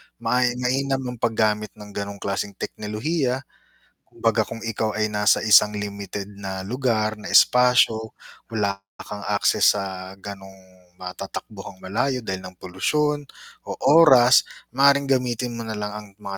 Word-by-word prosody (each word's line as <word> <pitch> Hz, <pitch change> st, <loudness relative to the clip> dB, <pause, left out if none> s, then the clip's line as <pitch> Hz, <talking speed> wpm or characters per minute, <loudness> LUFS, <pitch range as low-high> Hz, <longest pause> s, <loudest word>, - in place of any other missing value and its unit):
ma 115 Hz, +2 st, 0 dB, 0.2 s
mainam 135 Hz, +2 st, -1 dB
ang 125 Hz, -, -10 dB
paggamit 110 Hz, -2 st, 0 dB
ng 105 Hz, -1 st, -12 dB
ganong 100 Hz, 0 st, -5 dB
klaseng 100 Hz, 0 st, -3 dB
teknolohiya. 125 Hz, -, -3 dB, 0.6 s
Kumbaga -, -, 0 dB
kung 115 Hz, -, -8 dB
ikaw 110 Hz, -1 st, -2 dB
ay 110 Hz, 0 st, 0 dB
nasa 105 Hz, 0 st, +2 dB
isang 105 Hz, 0 st, +5 dB
limited 100 Hz, -1 st, -5 dB
na 95 Hz, -1 st, -5 dB
lugar, 110 Hz, -3 st, 0 dB
na 105 Hz, -, -8 dB
espasyo. 125 Hz, -3 st, +4 dB, 0.4 s
Wala 100 Hz, -3 st, -1 dB, 0.2 s
kang 100 Hz, -1 st, -8 dB
access 100 Hz, 0 st, +3 dB
sa 95 Hz, -1 st, -5 dB
ganong 95 Hz, -1 st, -9 dB, 0.5 s
matatakbuhang 95 Hz, +1 st, -8 dB
malayo 120 Hz, +7 st, -1 dB
dahil 95 Hz, -3 st, -4 dB
ng 95 Hz, 0 st, -10 dB
polusyon 145 Hz, +11 st, -1 dB, 0.4 s
o -, -, -4 dB
oras, 130 Hz, -6 st, +7 dB, 0.3 s
maaaring 140 Hz, +1 st, +4 dB
gamitin 125 Hz, -2 st, 0 dB
mo 115 Hz, -, -5 dB
na 110 Hz, -, -3 dB
lang 105 Hz, 0 st, -4 dB
ang 105 Hz, 0 st, -8 dB
mga 100 Hz, -1 st, -6 dB
105 Hz, 140 wpm, -23 LUFS, 100-125 Hz, 0.6 s, oras